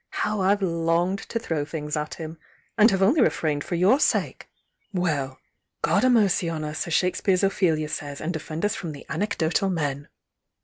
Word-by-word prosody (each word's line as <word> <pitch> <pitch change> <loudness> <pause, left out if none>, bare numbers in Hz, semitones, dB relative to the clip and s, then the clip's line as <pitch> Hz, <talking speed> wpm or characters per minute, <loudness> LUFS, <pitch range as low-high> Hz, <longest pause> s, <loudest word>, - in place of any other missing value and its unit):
How 210 -1 -1
I've 200 +2 +2
longed 170 +2 +1
to - - -2
throw 165 -9 -2
things 150 -1 -4
at 150 0 -3
him! 160 0 -8 0.4
and 220 0 +6
have 195 -2 +1
only 255 +10 +4
refrained 150 -9 +1
for 175 - -3
your 190 +10 +4
sake! - - 0 0.4
Well! 150 -8 -1 0.5
God - - +3
a' 255 - +5
mercy 205 -7 +3
on 160 -2 -3
us, 150 +2 -3
as 170 - -3
Shakespeare's 185 +1 +1
Ophelia 170 -6 +1
says, 145 -2 -5
ana 160 - -3
defend 160 +2 -4
us 205 - +1
from 165 -4 -5
the 140 - -11
ap»cdotal 195 0 0
men! 145 -4 -2
170 Hz, 180 wpm, -25 LUFS, 155-195 Hz, 0.5 s, and